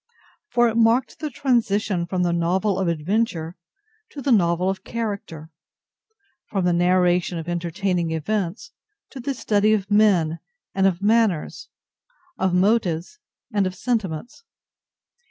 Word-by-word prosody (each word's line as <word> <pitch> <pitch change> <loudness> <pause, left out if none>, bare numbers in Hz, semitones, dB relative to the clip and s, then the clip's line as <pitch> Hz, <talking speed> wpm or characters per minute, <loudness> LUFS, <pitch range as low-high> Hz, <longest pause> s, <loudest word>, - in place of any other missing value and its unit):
For 240 0 +3
it 230 0 -1
marked 230 +3 +2
the 305 - -3
transition 215 -9 0
from 180 +1 -1
the 175 -1 +1
novel 185 +4 0
of 190 - 0
adventure 170 0 -1 0.5
to 290 - -9
the 275 0 -1
novel 175 -4 +3
of 190 0 -2
character—from 205 - -7
the 175 - +3
narration 180 0 +2
of 165 0 -6
entertaining 175 0 -1
events 190 - -3 0.4
to 270 - -9
the 270 +2 -3
study 215 -2 +2
of 205 -1 -2
men 185 -7 +3 0.3
and 195 0 +3
of 190 0 -1
manners, 215 -6 +1 0.7
of 190 -1 +1
motives 185 - +1 0.3
and 200 -2 +2
of 185 - -5
sentiments. 225 - -3
190 Hz, 130 wpm, -23 LUFS, 175-225 Hz, 0.7 s, For